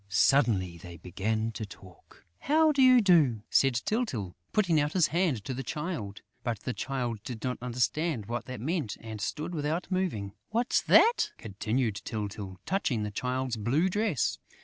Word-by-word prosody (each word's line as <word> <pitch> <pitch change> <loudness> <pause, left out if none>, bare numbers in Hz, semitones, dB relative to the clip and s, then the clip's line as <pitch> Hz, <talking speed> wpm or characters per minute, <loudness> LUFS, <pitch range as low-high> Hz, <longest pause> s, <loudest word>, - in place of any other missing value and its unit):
Suddenly, 100 -6 +3
they 85 0 -10
began 110 +6 -2
to 110 - -6
talk: 95 -3 -14
"How 315 +1 +4
do 280 -2 +2
you 255 -1 +7
do?" 150 - +4
said 135 -2 +4
Tyltyl, 125 - -2 0.2
putting 175 -7 +3
out 145 +1 -1
his 180 -4 +3
hand 165 - 0
to 135 - -3
the 130 - -4
Child. 130 - -5 0.2
But 115 -4 -2
the 125 - -3
Child 120 -3 -3
did 115 -2 -7
not 125 -1 -2
understand 125 +1 -1
what 120 +2 -4
that 130 -4 -7
meant 150 - -2
and 110 -2 -7
stood 155 +10 -3
without 160 +4 -2
moving. 160 - -1 0.2
"What's 235 +3 +1
that?" 470 +2 +5
continued 110 +1 -2
Tyltyl, 100 -3 -5
touching 145 - 0
the 105 - -3
Child's 125 +2 -2
blue 135 - +1
dress. 205 - 0
125 Hz, 165 wpm, -29 LUFS, 105-170 Hz, 0.2 s, you